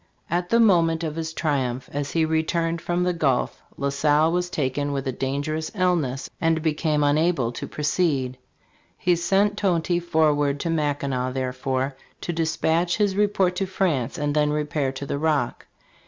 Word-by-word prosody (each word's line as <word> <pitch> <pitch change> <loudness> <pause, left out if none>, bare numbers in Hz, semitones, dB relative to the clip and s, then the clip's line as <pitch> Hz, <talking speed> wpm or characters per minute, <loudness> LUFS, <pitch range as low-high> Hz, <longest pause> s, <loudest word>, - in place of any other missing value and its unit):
"* - - -42
At 175 +1 0
the 230 - +4
moment 170 -7 +4
of 155 -2 -3
his 165 0 -3
triumph, 130 -6 -1
as 145 0 -2
he 165 -1 +1
returned 165 +1 0
from 175 +1 0
the 180 0 +1
Gulf, 140 -7 0 0.2
La 140 0 0
Salle 150 +3 +3
was 180 +1 0
taken 145 -2 -1
with 135 -1 -3
a - - +1
dangerous 145 +5 -2
illness 170 -9 0
and 165 -1 +2
became 150 -1 +1
unable 145 -4 +2
to - - -6
proceed. 145 -5 0 0.6
He 180 -1 +2
sent 195 +4 +2
Tonty 175 -2 +1
forward 150 -4 +2
to 170 - -1
Mackinac, 140 -5 -1
therefore, 130 +1 -2 0.3
to 175 - -3
dispatch 165 +1 +1
his 205 -3 +1
report 200 -3 +2
to 195 - -1
France 175 -9 -1
and 145 -1 -1
then 150 0 +2
repair 150 -2 -1
to 135 +1 -6
the 140 - -3
Rock. 150 -5 0
155 Hz, 170 wpm, -24 LUFS, 140-170 Hz, 0.6 s, the